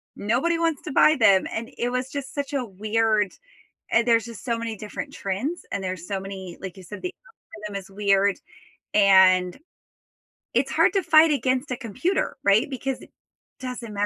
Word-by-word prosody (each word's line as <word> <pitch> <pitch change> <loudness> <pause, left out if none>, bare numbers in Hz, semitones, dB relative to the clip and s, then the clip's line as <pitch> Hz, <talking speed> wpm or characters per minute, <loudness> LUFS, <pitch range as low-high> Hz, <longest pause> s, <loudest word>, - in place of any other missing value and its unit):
nobody 270 +11 0
wants 330 -4 0
to - - -5
buy 305 +3 +5
them," 195 -4 +5
and 230 +1 -5
it 240 - -1
was 250 +2 -3
just 280 -2 -5
such 285 -1 -3
a 270 -3 -1
weird 215 0 0 0.6
and 230 +1 +3
there's 230 -2 +4
just 230 -5 -10
so 235 -2 0
many 230 -1 -4
different 215 +7 -7
trends, 235 - -3
and 195 - -3
there's 185 -2 -5
so 195 -2 -2
many, 190 -2 -8
like 190 -1 -7
you 190 - -11
said, 205 +4 -9
the 365 0 -4 0.5
algorithm 200 -1 -4
is 190 - -17
weird, 200 -1 +2 0.6
and 190 -3 +5 1.0
it's - - +1
hard - - +3
to 390 - +1
fight 315 0 +6
against 260 -1 0
a 250 - -2
computer, 255 - -2
right? 200 +5 +3
Because 270 0 -4
it - - -15 0.5
doesn't 250 -4 -6
matter 205 0 0
225 Hz, 185 wpm, -24 LUFS, 195-265 Hz, 1.0 s, fight